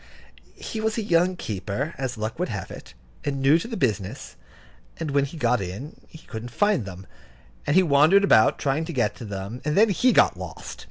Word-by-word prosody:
He 220 - -6
was 220 0 -1
a 225 - -1
young 180 -1 +2
keeper, 110 - -4
as 130 -3 -4
luck 110 +6 -4
would 180 - -1
have 100 -5 -5
it, 65 - -11 0.3
and 140 -2 -2
new 140 +5 +4
to 200 - -6
the 230 -2 -5
business; 105 -8 -2 0.6
and 160 -3 -4
when 140 0 +2
he 150 +4 -9
got 125 -7 +1
in, 100 - -6
he - - -13
couldn't 115 +1 -7
find 205 - +1
them, 95 0 -9 0.6
and - - +2
he 190 - +6
wandered 160 +6 +5
about, 110 - +5
trying 140 +3 0
to 170 - -6
get 120 -6 0
to 115 - -8
them, 100 +4 -6
and 150 +3 -1
then 220 +2 +6
he 245 +6 +3
got - - +4
lost. - - -8
140 Hz, 210 wpm, -24 LUFS, 110-175 Hz, 0.6 s, he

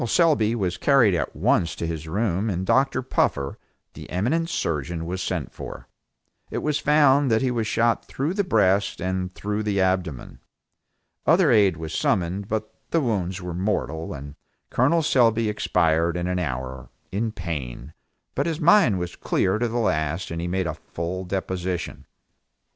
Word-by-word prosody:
Selby 120 -7 +3
was 90 -5 -1
carried 130 -8 +4
at 85 - -2
once 85 - +1
to - - -4
his 80 -1 -4
room 100 +3 0
and 95 -1 -2
Dr. 135 +3 +2
Puffer, 70 - 0 0.3
the - - -10
eminent 145 - 0
surgeon 80 - -2
was 90 +2 -3
sent - - -3
for. - - -8 0.6
It - - -4
was 150 0 +1
found 145 -2 +4
that 110 +2 +2
he 130 - +1
was 115 -3 -1
shot 115 +1 +1
through 145 +6 -2
the 200 +1 +1
breast 100 - +2
and 95 +1 -2
through 105 +1 -2
the 105 -2 0
abdomen. 95 -8 -1 0.9
Other 165 -2 +5
aid 100 -7 +4
was 80 -1 -6
summoned, 95 +2 0
but 110 0 -3 0.2
the 165 - +2
wounds 95 - -1
were 90 -1 -4
mortal, 85 -3 -2
and 70 -1 -7 0.4
Col 150 +7 +3
Selby 115 -5 +3
expired 85 -5 +1
in 90 - -2
an 90 0 -1
hour, 65 -5 -4 0.2
in 110 +4 -1
pain, 75 - -6 0.4
but - - 0
his 165 -1 -2
mind 170 - +5
was 90 -1 -4
clear 95 +3 0
to 120 - +1
the 115 +1 -3
last 85 -6 0
and 85 0 -3
he 85 - -2
made 95 +1 -1
a - - -2
full 90 +3 -5
deposition. 95 -1 -3
95 Hz, 165 wpm, -24 LUFS, 85-115 Hz, 0.9 s, Other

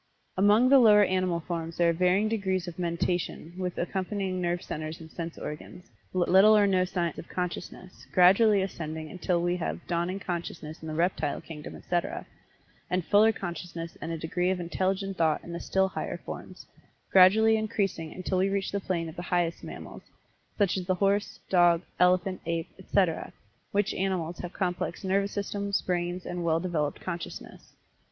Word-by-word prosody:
Among 205 +6 +5
the 275 0 +8
lower 210 -4 +7
animal 185 -3 +1
forms 165 -1 -4
there 170 -1 +4
are - - -1
varying 180 +5 +2
degrees 190 -5 -1
of 175 0 -7
mentation 170 -1 -2
with 180 -1 -4
accompanying 190 0 -2
nerve 175 0 -1
centers 155 +1 -5
and 160 -1 -12
sense 165 -1 -6
organs, 155 +4 -8 0.2
but 180 -2 +1
little 205 +4 +7
or 205 - +5
no 185 -2 +3
signs 175 -2 -2
of - - -9
consciousness, 180 0 -6
gradually 195 +3 +5
ascending 160 -4 -5
until 180 -1 0
we 175 +1 +1
have 175 0 -4
dawning 175 +2 -1
consciousness 170 -4 -5
in 160 - -7
the 155 - -4
reptile 165 -3 0
kingdom, 150 -2 -9
etc., 175 -1 -2 0.6
and 180 -2 0
fuller 215 +2 +5
consciousness 170 -4 -6
and 165 - -4
a 165 - -2
degree 175 +3 -1
of 185 -1 0
intelligent 190 +2 -1
thought 160 -2 +2
in 170 - -8
the 170 - -4
still 190 0 +1
higher - - -4
forms, - - -9 0.5
gradually 215 +4 +7
increasing 195 -7 -1
until 185 0 -2
we 190 +1 +2
reach 195 0 -1
the 200 - -1
plane 175 -4 -2
of 160 - -8
the 175 - -5
highest 175 -2 0
mammals, - - -8 0.6
such 200 -3 +2
as 180 -1 -4
the 185 - +2
horse, 200 +2 0
dog, 175 -2 +4 0.2
elephant, 180 +1 +3
ape, 165 -1 -2
etc., 185 -3 0 0.4
which 200 0 +1
animals 180 -3 -2
have 175 - -5
complex 180 0 -2
nervous 195 +1 +1
systems, 200 0 -1
brains 175 0 -2
and 175 0 -4
well 165 -1 +2
developed 165 -5 -2
consciousness. 170 -2 -7
180 Hz, 175 wpm, -28 LUFS, 170-195 Hz, 0.6 s, the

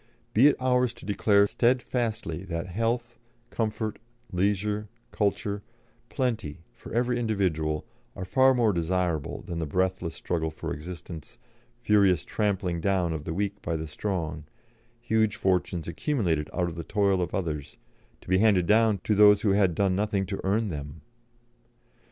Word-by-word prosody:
Be 125 +7 +7
it 150 - +4
ours 125 -1 +2
to - - -12
declare 100 0 +3
steadfastly 120 -7 0
that 85 -2 -3
health, 115 +6 -2 0.3
comfort, 110 -1 -2 0.3
leisure, 105 +3 0 0.2
culture, 100 0 -1 0.5
plenty 110 - -2
for - - -12
every 120 +1 +1
individual 85 -9 0 0.3
are 95 - -5
far 130 +6 +4
more 115 -4 +3
desirable 85 -3 -1
than 85 -1 -4
breathless 90 +1 -1
struggle 80 -2 -2
for 80 - -5
existence, 85 0 -8 0.4
furious 100 -8 +3
trampling 95 -5 -1
down 90 -3 +1
of 75 -2 -5
the 80 - -3
weak 100 +1 -2
by 80 - -2
the 80 0 -3
strong, 80 -2 -3 0.5
huge 110 -2 +1
fortunes 90 -5 0
accumulated 85 - -1
out 90 - 0
of 85 - -5
the 85 0 -6
toil 100 0 +1
of 90 - -2
others, 80 -7 -4 0.4
to - - -20
be 95 +1 +3
handed 100 -5 +4
down 110 +1 +4
to 110 - +1
those 105 +1 +6
who 105 - +3
had 95 -4 +3
done 95 -1 +2
nothing 100 -1 0
to 100 +2 -4
earn 105 +3 +1
them. 75 -1 -6
100 Hz, 150 wpm, -27 LUFS, 85-110 Hz, 0.5 s, Be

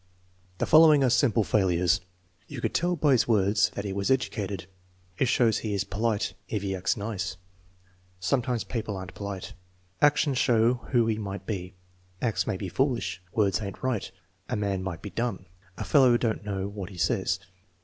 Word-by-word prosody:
The - - 0
following 155 -2 +7
are 130 - +3
sample 120 -2 +3
failures: 90 -3 +2 0.5
"You - - -7
could - - -2
tell 175 +1 +1
by 150 -4 +2
his 125 -3 +3
words 100 -2 +3
that 100 - -4
he 100 - -3
was 100 +3 -1
educated." 105 -8 -1 0.5
"It 130 - +3
shows 115 -2 +3
he 105 -2 -2
is 95 - 0
polite 105 +2 -1 0.2
if 105 -3 -2
he 95 -1 -1
acts 95 +4 0
nice." 100 -3 -4 0.8
"Sometimes 120 +5 0
people 110 -4 -4
are 95 - -5
n't 90 - -12
polite." 100 0 -6 0.5
"Actions 145 -2 +3
show 115 0 +4 0.2
who 120 -3 +3
he 110 -1 0
might 100 -1 -5
be." 95 -4 -5 0.4
"Acts 105 -7 0
may 95 - -1
be 95 - -4
foolish." 120 -2 -1
"Words 100 -2 +1
ain't 100 +2 -7
right." 130 -6 -1 0.4
"A - - -1
man 100 -3 -1
might 90 -3 -5
be 100 - -6
dumb." 110 -2 -3 0.3
"A - - -3
fellow 130 -5 +5
don't 115 -3 -1
know 100 -2 -3
what 100 -2 -6
he 95 - -11
says." 95 +2 +1
105 Hz, 180 wpm, -27 LUFS, 95-120 Hz, 0.8 s, following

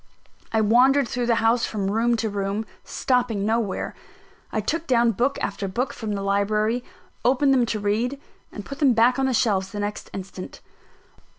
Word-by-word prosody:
I 220 - +2
wandered 250 +5 +4
through 245 0 -2
the 235 - +3
house 230 +1 +3
from 200 -2 -2
room 235 +3 +2
to 225 -1 -1
room, 200 +2 -2 0.2
stopping 245 -6 0
nowhere. 220 -2 -1 0.6
I - - -1
took 325 +10 -2
down 240 -3 +4
book 250 +7 0
after 200 0 -2
book 240 +7 -2
from 215 -2 -4
the 200 -1 -3
library, 210 +4 +1 0.4
opened 270 +2 +3
them 250 -3 +3
to 220 - -2
read, 225 +7 -1 0.3
and 205 - -8
put 275 -1 -8
them 275 -4 +4
back 235 +3 +4
on 265 - +2
the 260 - 0
shelves 195 -4 +1
the 205 - -5
next 205 0 -4
instant. 190 -1 -8
225 Hz, 180 wpm, -24 LUFS, 205-250 Hz, 0.6 s, wandered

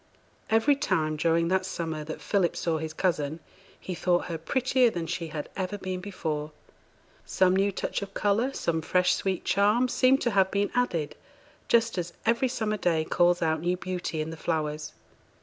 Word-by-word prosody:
Every 225 +6 +4
time 180 - 0
during 165 +2 +2
that 190 0 +2
summer 165 -4 -4
that 155 - -7
Philip 190 -5 +1
saw 165 -2 0
his 160 0 -4
cousin, 155 -3 -1 0.4
he 185 - -5
thought 175 0 +1
her 165 -1 -3
prettier 255 +7 +2
than 170 -6 -4
she 170 0 -3
had 150 -1 -5
ever 190 +1 -3
been 185 -2 -4
before; 155 -6 -4 0.7
some 185 0 +2
new 195 +1 +2
touch 195 - -3
of 195 0 -7
colour, 215 +6 +1
some 165 -10 -1
fresh 180 +3 +2
sweet 190 -2 -2
charm, 210 +6 +3
seemed 255 +2 +3
to 240 - +1
have 195 -2 +3
been 200 +1 0
added, 175 -12 0 0.5
just 230 -4 +2
as 175 0 -4
every 235 +3 +3
summer 220 -4 -2
day 165 -5 +1
calls 175 +1 +2
out 160 -1 +1
new 175 +2 0
beauty 180 -3 -3
in 155 +1 -4
the 165 - -8
flowers. 155 -2 -2
180 Hz, 180 wpm, -27 LUFS, 160-205 Hz, 0.7 s, Every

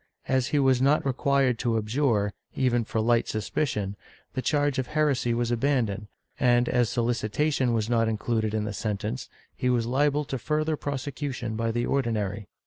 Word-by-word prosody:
As 130 -1 +2
he 150 - 0
was 130 -3 +3
not 140 +3 +3
required 135 -2 +2
to 115 -2 +1
abjure, 110 -2 +1 0.2
even 120 -3 +2
for 110 - -2
light 115 +1 +2
suspicion, 105 -2 -2 0.4
the 130 - -2
charge 145 -1 +1
of 130 - -2
heresy 150 -6 +1
was 120 0 0
abandoned, 115 -5 0 0.3
and 120 -2 +4
as 120 -3 +2
solicitation 120 +3 0
was 110 -2 0
not 115 -1 +2
included 110 0 -1
in 110 - 0
the 105 -1 -3
sentence, 105 +4 -3 0.3
he 125 - 0
was 120 -2 +2
liable 145 +4 +1
to 135 -1 -4
further 155 +3 0
prose 140 -3 -4
cution 135 -5 -4
by 115 +1 -1
the 120 +1 -1
Ordinary. 110 -7 -1
120 Hz, 170 wpm, -27 LUFS, 110-140 Hz, 0.4 s, and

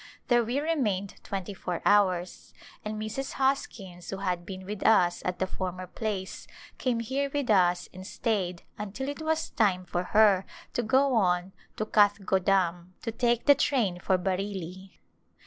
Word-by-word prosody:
There 240 -1 +5
we 240 +5 -1
remained 230 - -1
twenty 195 0 -4
four 180 -2 -4
hours, 185 -3 +2 0.3
and 215 0 -4
Mrs. 220 +6 -4
Hoskins 200 -10 -2
who 195 - -3
had 180 -3 -2
been 190 -1 -7
with 205 +1 -5
us 180 -6 +4
at 180 0 -1
the 190 - 0
former 185 -1 -4
place 195 0 -4 0.3
came 240 -3 0
here 275 +5 -1
with 280 -5 0
us 180 -3 +3
and 185 +1 -9
stayed 185 -8 -2 0.2
until 210 +6 -4
it 290 +2 -6
was 315 0 -1
time 185 -4 +1
for 175 +1 -2
her 205 -3 +5 0.3
to - - 0
go 260 +4 +3
on 180 -4 +2 0.2
to 215 - -2
Kathgo 205 -3 +3
dam 180 -2 +1
to 230 - -2
take 235 +1 +1
the 285 - +8
train 225 -12 +1
for 185 +1 +2
Bareilly. 190 0 -4
200 Hz, 165 wpm, -28 LUFS, 185-230 Hz, 0.3 s, the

